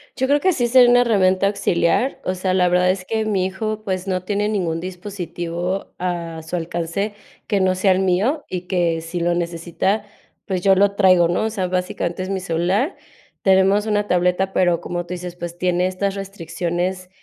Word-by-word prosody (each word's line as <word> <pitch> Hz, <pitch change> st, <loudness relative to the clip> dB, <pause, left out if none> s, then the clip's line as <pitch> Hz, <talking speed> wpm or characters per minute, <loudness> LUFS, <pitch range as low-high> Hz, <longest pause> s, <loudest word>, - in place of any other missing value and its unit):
Yo 260 Hz, -, 0 dB
creo 290 Hz, +1 st, +3 dB
que 375 Hz, +1 st, +2 dB
sí 240 Hz, -4 st, +1 dB
sería 245 Hz, 0 st, +6 dB
una 245 Hz, 0 st, +6 dB
herramienta 195 Hz, -4 st, +3 dB
auxiliar, 200 Hz, +4 st, +1 dB
o 185 Hz, -, -1 dB
sea, 185 Hz, 0 st, -1 dB
la 180 Hz, -1 st, +3 dB
verdad 180 Hz, +1 st, +3 dB
es 185 Hz, 0 st, -1 dB
que 220 Hz, -1 st, -1 dB
mi 195 Hz, -4 st, +1 dB
hijo, 215 Hz, +3 st, -3 dB
pues, 190 Hz, -2 st, -3 dB
no 185 Hz, -1 st, -1 dB
tiene 205 Hz, +2 st, -1 dB
ningún 170 Hz, -6 st, -1 dB
dispositivo 180 Hz, 0 st, -5 dB
a 170 Hz, -3 st, -3 dB
su 180 Hz, -, -3 dB
alcance 175 Hz, +5 st, -3 dB, 0.3 s
que 200 Hz, -2 st, +1 dB
no 185 Hz, 0 st, +2 dB
sea 190 Hz, +1 st, +3 dB
el 185 Hz, -, +3 dB
mío, 200 Hz, -, +1 dB
y 180 Hz, -1 st, -3 dB
que 175 Hz, -3 st, 0 dB
si 165 Hz, +2 st, -5 dB
lo 175 Hz, 0 st, +1 dB
necesita, 175 Hz, +4 st, -1 dB, 0.4 s
pues, 185 Hz, -2 st, -2 dB
yo 195 Hz, 0 st, +5 dB
lo 200 Hz, +1 st, +3 dB
traigo, 185 Hz, -4 st, +5 dB
¿no?, 175 Hz, +5 st, 0 dB
o 220 Hz, -, 0 dB
sea, 190 Hz, -4 st, -2 dB
básicamente 180 Hz, 0 st, -2 dB
es 185 Hz, -, -6 dB
mi 195 Hz, -1 st, -1 dB
celular. 185 Hz, -, 0 dB, 0.5 s
Tenemos 195 Hz, +2 st, +4 dB
una 210 Hz, -1 st, 0 dB
tableta, 180 Hz, +2 st, +1 dB
pero 175 Hz, -2 st, +2 dB
como 175 Hz, 0 st, -4 dB
tú 180 Hz, -, -6 dB
dices, 180 Hz, 0 st, -6 dB
pues, 175 Hz, 0 st, -7 dB
tiene 180 Hz, 0 st, +1 dB
estas 195 Hz, +1 st, -2 dB
restricciones, 180 Hz, -1 st, -3 dB
185 Hz, 195 wpm, -21 LUFS, 175-200 Hz, 0.5 s, sería